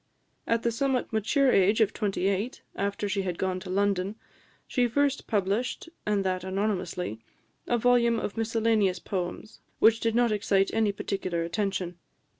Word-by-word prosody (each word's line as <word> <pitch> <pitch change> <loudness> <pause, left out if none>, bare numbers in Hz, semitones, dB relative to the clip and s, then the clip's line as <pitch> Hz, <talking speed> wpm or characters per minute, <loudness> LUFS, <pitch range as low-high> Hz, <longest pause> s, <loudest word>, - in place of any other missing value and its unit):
At 230 0 +1
the 235 - +2
somewhat 255 0 -1
mature 255 +5 +3
age 195 +3 +4
of 220 -1 +3
twenty 200 -4 -1
eight, 200 +6 -2
after 200 +1 -2
she 200 0 0
had 180 -3 -3
gone 185 -1 -1
to 185 - -9
London, 195 +1 0 0.5
she 250 -2 +1
first 280 +3 0
published, 210 - -1 0.2
and 205 -2 +1
that 185 -1 -1
anonymously, 185 - -2 0.5
a 240 - +2
volume 235 0 +3
of 205 - -4
miscellaneous 225 -4 +1
poems, 185 +3 -5 0.2
which 225 +1 +5
did 230 -1 0
not 240 -1 +3
excite 200 -2 +2
any 220 -2 +2
particular 185 -4 -2
attention. 180 -1 -2
205 Hz, 155 wpm, -28 LUFS, 190-230 Hz, 0.5 s, which